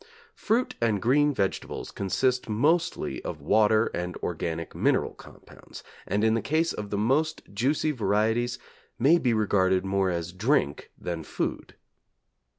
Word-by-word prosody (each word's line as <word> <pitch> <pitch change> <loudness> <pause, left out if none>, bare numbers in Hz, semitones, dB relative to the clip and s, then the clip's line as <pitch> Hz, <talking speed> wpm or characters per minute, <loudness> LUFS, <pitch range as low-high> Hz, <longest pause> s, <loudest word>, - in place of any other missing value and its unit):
Fruit 235 +4 0
and 110 -3 +2
green 145 +8 +3
vegetables 100 -8 -3
consist 125 +6 0
mostly 155 +11 0
of - - -5
water 110 +1 +3
and 90 0 -4
organic 85 -1 -3
mineral - - +1
compounds, - - -14 0.2
and 105 +1 0
in 110 0 +4
the 115 - +1
case 160 +3 0
of 105 -1 -6
the 100 - -2
most 140 +9 +1
juicy 140 +8 +1
varieties 115 0 0 0.4
may 145 +8 +5
be 125 - +1
regarded 95 -4 +2
more 95 -1 +1
as 85 -1 -3
drink 105 - 0
than 85 -2 -4
food. - - -4
110 Hz, 140 wpm, -27 LUFS, 95-135 Hz, 0.4 s, may